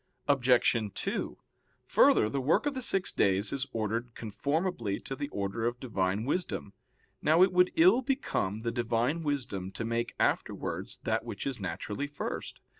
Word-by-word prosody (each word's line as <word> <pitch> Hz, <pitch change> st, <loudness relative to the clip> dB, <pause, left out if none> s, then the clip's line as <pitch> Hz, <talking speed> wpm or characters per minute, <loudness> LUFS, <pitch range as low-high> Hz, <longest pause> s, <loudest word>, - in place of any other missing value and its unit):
Obj. 130 Hz, -3 st, +4 dB, 0.2 s
2: -, -, -3 dB, 0.5 s
Further, -, -, +5 dB
the 135 Hz, +5 st, -2 dB
work 150 Hz, -, +2 dB
of 290 Hz, -, 0 dB
the 260 Hz, -, -4 dB
six 195 Hz, -6 st, +1 dB
days 100 Hz, +1 st, +2 dB
is 140 Hz, 0 st, -1 dB
ordered 115 Hz, +1 st, -2 dB
conformably 120 Hz, -, -2 dB
to 135 Hz, -, -5 dB
the 145 Hz, +2 st, -4 dB
order 100 Hz, +2 st, -2 dB
of 120 Hz, 0 st, -3 dB
Divine 100 Hz, -3 st, -1 dB
wisdom. 145 Hz, -, -2 dB, 0.5 s
Now 160 Hz, +4 st, +5 dB
it 185 Hz, -1 st, +3 dB
would 180 Hz, 0 st, +4 dB
ill 185 Hz, +10 st, +6 dB
become 115 Hz, -, -1 dB
the 115 Hz, -, 0 dB
Divine 120 Hz, +6 st, 0 dB
wisdom 125 Hz, -, -2 dB
to 115 Hz, -, -4 dB
make 115 Hz, +1 st, -2 dB
afterwards -, -, -1 dB
that -, -, 0 dB
which -, -, -6 dB
is -, -, -3 dB
naturally 140 Hz, +8 st, -4 dB
first. 145 Hz, 0 st, -5 dB
125 Hz, 160 wpm, -30 LUFS, 110-155 Hz, 0.5 s, ill